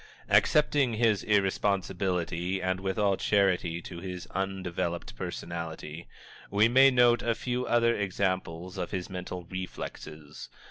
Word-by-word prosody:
Accepting 145 -5 +3
his 110 -3 +2
irresponsibility, 95 -3 0
and 95 0 -1
with 95 +1 -3
all 100 -2 +2
charity 90 -4 +1
to 85 - -8
his 90 0 -6
undeveloped 90 -5 -3
personality, 80 +2 -6 0.4
we 105 +2 +4
may 135 +3 +7
note 120 -2 +4
a 115 -1 0
few 125 +1 -2
other 115 0 +3
examples 95 -2 -2
of 90 - -3
his 95 -1 -4
mental 90 -1 -5
reflexes. 80 -4 -8
95 Hz, 125 wpm, -29 LUFS, 90-105 Hz, 0.4 s, may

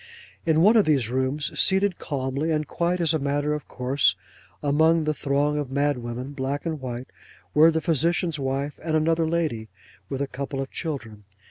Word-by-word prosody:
In 160 0 +4
one 210 +6 +6
of 215 - +5
these 135 -7 +1
rooms, 130 +3 -1
seated, 190 -1 +3
calmly, 140 +2 -2
and 155 -2 0
quite 175 +1 -1
as 165 -2 +3
a 160 - +1
matter 145 +1 0
of 150 -1 -5
course, 130 -4 +2 0.5
among 160 +2 +3
a 155 - +2
throng 145 +1 0
of 145 -3 -4
mad 140 0 0
women, 120 +3 -5
black 140 +2 -3
and 160 -4 -3
white, 125 0 -6 0.4
were 155 +2 +7
the 160 0 0
physician's 165 +1 +1
wife 135 +2 -2
and 160 -1 -1
another 160 +1 +2
lady, 155 -10 -1 0.4
with 135 - -3
a - - -3
couple 135 +1 -5
of 135 0 -4
children. 115 - -5
145 Hz, 185 wpm, -25 LUFS, 135-160 Hz, 0.5 s, were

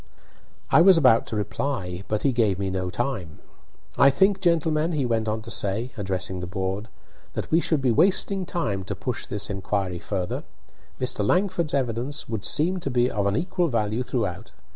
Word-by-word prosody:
I - - +7
was 185 0 +7
about 130 -7 +5
to - - -4
reply, 105 -3 -3
but 105 -1 -1
he 140 - +3
gave 110 -6 +1
me 95 -1 -2
no 95 -1 -2
time. 90 - -3 0.6
"I 140 - +8
think, 190 +8 +2
gentlemen," 165 -2 +1
he 145 -4 0
went 115 -2 0
on 110 0 -2
to - - -7
say, 105 +6 -1
addressing 95 -3 -2
the 90 - -5
board," 95 +3 -3 0.5
that - - -5
we 165 - +5
should 155 -5 0
be 125 - +3
wasting 190 - +3
time 110 - -2
to - - -4
push 125 -3 -4
this 105 -1 -3
inquiry 95 -2 -2
further. 95 -2 -3 0.6
Mr. 125 -5 0
Langford's 175 - +1
evidence 125 +1 -2
would 110 -3 -4
seem 180 +5 +2
to 150 - -4
be 125 -1 +2
of 100 -2 0
an 100 - +1
equal 180 +2 0
value 110 -3 0
throughout. 110 -6 -3
115 Hz, 185 wpm, -25 LUFS, 100-150 Hz, 0.6 s, I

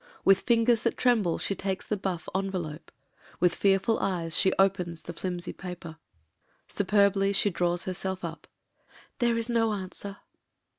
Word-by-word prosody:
With 195 -1 +6
fingers 230 -1 +3
that - - -1
tremble 220 -9 +2
she - - -1
takes 190 0 -3
the 210 - -1
buff 185 -4 -4
envelope 185 -5 -3 0.2
— - - -26
^with 180 -1 +4
fearful 195 +4 +2
eyes 170 -4 0
she 190 - +4
opens 180 -4 +1
the 170 - -7
flimsy 175 +1 -4
paper. 175 -3 -8 0.7
Superbly 200 -1 +2
she 200 +1 +2
draws 175 0 0
herself 185 0 -3
up 165 0 -8 0.4
— - - -26
"There 235 -1 +2
is 230 0 -1
no 230 -2 +2
an 190 -2 -5
swer." 200 0 -7
190 Hz, 160 wpm, -28 LUFS, 175-205 Hz, 0.7 s, With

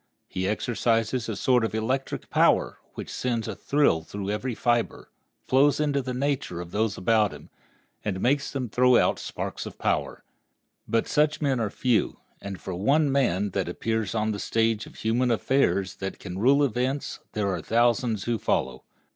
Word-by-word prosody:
He 95 0 -2
exercises 115 +2 0
a 110 - -2
sort 125 +3 +2
of 110 - -2
electric 130 +5 -2
power, - - +3 0.2
which - - -7
sends 120 -3 -2
a - - -4
thrill 140 - +2
through 100 +4 -5
every 120 +3 -2
fiber, 120 0 -1 0.4
flows 140 +3 +4
into 145 -2 +1
the 130 0 -4
nature 135 -9 -1
of 85 -1 -7
those 110 -1 0
about 105 +2 +2
him, - - -12 0.5
and 95 -3 -2
makes 140 +6 +1
them 135 -3 -3
throw 125 +2 +4
out - - +2
sparks - - -5
of - - -10
power. - - -1 0.6
But 115 - +1
such 150 +1 +2
men 135 -4 +1
are 110 -2 0
but - - -20
few; 125 -4 +1 0.2
and 100 -2 -6
for 95 - -6
one 140 - +2
man 105 -8 +1
that 95 -2 -1
appears 110 +3 -2
on 110 0 +1
the 100 - -4
stage 115 0 0
of - - -14
human 120 +3 +1
affairs 100 -6 +1
that 95 0 -5
can 95 -1 -7
rule 140 +6 +4
events 130 +2 -1
there 105 -2 0
are 95 - -2
thousands 120 -2 +1
who 120 -2 -1
follow. 65 0 -1
115 Hz, 180 wpm, -26 LUFS, 100-130 Hz, 0.6 s, flows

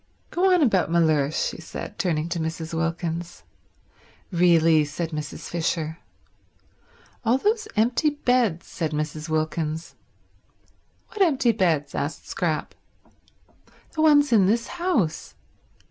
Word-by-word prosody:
Go 375 +2 +2
on 360 -3 +4
about 195 - +2
Mellersh," 155 -3 +2
she - - -9
said, 160 - -8
turning 160 -3 0
to 170 0 -2
Mrs. 160 0 -4
Wilkins. 165 +1 -3 0.9
"Really—" 165 -3 +4
said 155 +3 -4
Mrs. 150 -1 -6
Fisher. 165 -1 -2 1.2
"All 240 +2 +3
those 430 - 0
empty 235 +7 +2
beds," 245 - +1
said 160 -3 -4
Mrs. 150 +1 -3
Wilkins. 155 +1 -2 1.2
"What 425 - -5
empty 275 -9 +4
beds?" 165 -9 0
asked 145 +1 -4
Scrap. 160 -4 -2 1.2
"The 315 - -2
ones 290 -3 +5
in 200 -4 +5
this 230 +3 +1
house. 230 - 0
170 Hz, 115 wpm, -24 LUFS, 160-240 Hz, 1.2 s, ones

